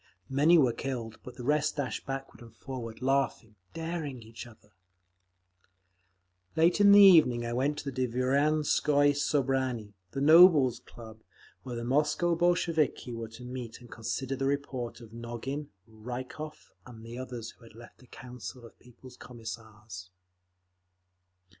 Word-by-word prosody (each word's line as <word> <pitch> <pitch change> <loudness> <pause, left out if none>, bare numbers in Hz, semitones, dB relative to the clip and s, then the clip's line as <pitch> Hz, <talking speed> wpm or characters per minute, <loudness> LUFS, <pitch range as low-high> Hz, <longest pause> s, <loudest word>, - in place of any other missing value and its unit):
Many 150 +6 +5
were 130 -6 +4
killed, 120 -5 -5
but 125 - -11
the 125 - -8
rest 150 +3 +1
dashed 140 -4 -4
backward 135 -1 -6
and 115 -2 -14
forward, 125 -3 -8
laughing, 135 -4 0 0.2
daring 160 -7 -5
each 115 +2 -10
other…. 110 -3 -19 1.8
Late 170 +5 +3
in 200 0 +7
the 205 - +9
evening 155 -12 +7
I 120 - -3
went 140 +4 0
to 140 -2 -5
the 130 -1 -1
Dvorianskoye 145 +3 +2
Sobranie—the 130 -8 -2
Nobles' 155 -4 +6
Club—where 115 +2 -13
the 115 - -4
Moscow 150 +7 +1
Bolsheviki 165 -6 0
were 115 -1 -6
to 115 +2 -12
meet 125 -2 -7
and 120 -2 -16
consider 120 +4 -4
the 135 0 -1
report 130 -4 -3
of 115 -1 -13
Nogin, 120 +5 -6 0.2
Rykov 125 +7 -8 0.2
and 115 -2 -12
the 120 +2 -8
others 120 -3 -7
who - - -23
had 115 -1 -16
left 120 +1 -14
the 125 - -19
Council 125 -1 -10
of 115 - -16
People's 125 +1 -16
Commissars. 110 -5 -10
125 Hz, 140 wpm, -29 LUFS, 115-145 Hz, 1.8 s, the